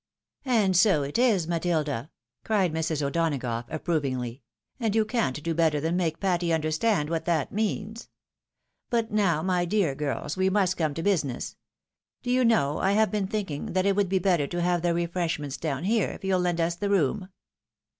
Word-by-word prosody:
" - - -43 0.2
And 190 -1 +1
so 180 -5 +4
it 140 +10 -2
is, 210 -10 +3
Matilda! 155 -6 -1 0.2
" 120 +1 -59
cried 195 -7 +1
Sirs. 155 -2 -1
O'Donagough, 140 -6 -1
approv 155 +1 -1
ingly, 130 -2 -4 0.2
" 110 - -49
and 225 -3 0
you 220 -1 +3
can't 215 - -1
do 165 0 -1
better 160 -2 +2
than 165 +4 -1
make 165 -3 -1
Patty 175 -3 0
understand 160 +3 +1
what 165 -1 -1
that 165 -5 0
means. 215 +1 -3 0.8
But 230 -2 0
now, 185 -7 +2
my 180 -1 +1
dear 175 -4 +1
girls, 145 +1 -3
we 190 0 +2
must 190 -2 +2
come 155 -4 -1
to 165 - -3
business. 160 -10 -1 0.7
Do 245 - -1
you 255 0 +3
know 210 - +2
I 195 - +2
have 220 +1 +3
been 205 -3 -1
thinking 190 -10 -4
that 185 0 +1
it 200 -1 +3
would 200 -2 +1
be 190 - +2
better 175 -6 +2
to 175 +3 -3
have 175 -1 +1
the 170 0 +1
refreshments 170 -5 -2
down 150 -2 -3
here, 215 +3 +1
if - - -9
you'll 190 -1 +1
lend 175 -1 0
us 170 +1 +1
the 200 +4 -3
room 185 -1 +1
175 Hz, 195 wpm, -26 LUFS, 155-200 Hz, 0.8 s, so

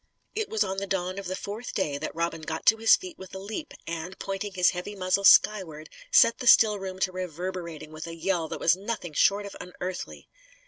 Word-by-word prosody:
It 435 0 -2
was 220 -1 +1
on 190 -1 -4
the 200 +1 -3
dawn 185 0 -2
of 195 - -7
the 185 - -3
fourth 210 +5 -6
day 145 -7 -1
that - - -5
Robin 165 -1 -2
got 160 +1 -5
to 225 - +6
his 225 0 +6
feet 365 -3 -9
with 190 0 -10
a - - -4
leap, 215 - -6
and, 170 +3 -5
pointing 195 +1 -4
his 180 -1 +4
heavy 185 +3 -6
muzzle 185 +1 0
skyward, 165 -8 +4 0.2
set 230 - +6
the 250 - -4
still 215 -3 +6
room 190 -1 -6
to 185 - +1
reverberating 180 -3 -6
with 155 +1 -7
a 165 - -7
yell 170 -1 -1
that - - -6
was 170 - +4
nothing 195 -4 -5
short 200 +7 +3
of 200 - -9
unearthly. 180 +1 -7
185 Hz, 220 wpm, -27 LUFS, 170-205 Hz, 0.2 s, to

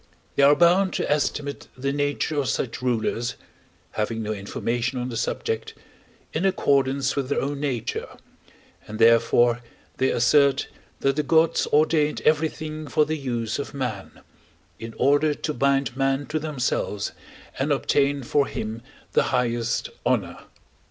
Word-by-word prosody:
They - - +2
are 140 +1 +7
bound 180 +3 +4
to - - -1
estimate 145 -1 -1
the 140 +2 -1
nature 145 +1 -1
of 135 - 0
such 120 -1 -2
rulers 120 -1 -1 0.6
(having 110 +1 -2
no 110 0 -2
information 115 +5 -2
on 125 0 -3
the 120 - -5
subject) 110 0 -3 0.6
in 160 - -1
accordance 140 -7 +2
with 135 -2 -2
their 145 - +1
own 140 +1 -2
nature, 135 -6 -3 0.7
and 110 - -6
therefore 115 +1 +4 0.4
they 130 - +2
assert 140 +3 +3 0.3
that 135 +1 +1
the - - +3
gods 160 +2 +3
ordained 150 0 +2
everything 155 0 0
for 150 +3 +2
the 155 +1 -2
use 120 -6 -3
of 140 - -6
man, 115 -8 -5 0.6
in 115 0 -8
order 145 +2 +3
to 150 - -3
bind 135 -1 +1
man 135 +1 0
to 155 - -1
themselves 125 -8 -2 0.5
and 140 +3 0
obtain 140 0 +1
from 140 +4 +2
him 110 +2 -5 0.3
the - - +3
highest 120 -2 0 0.2
honor. - - -1
135 Hz, 145 wpm, -24 LUFS, 120-145 Hz, 0.7 s, are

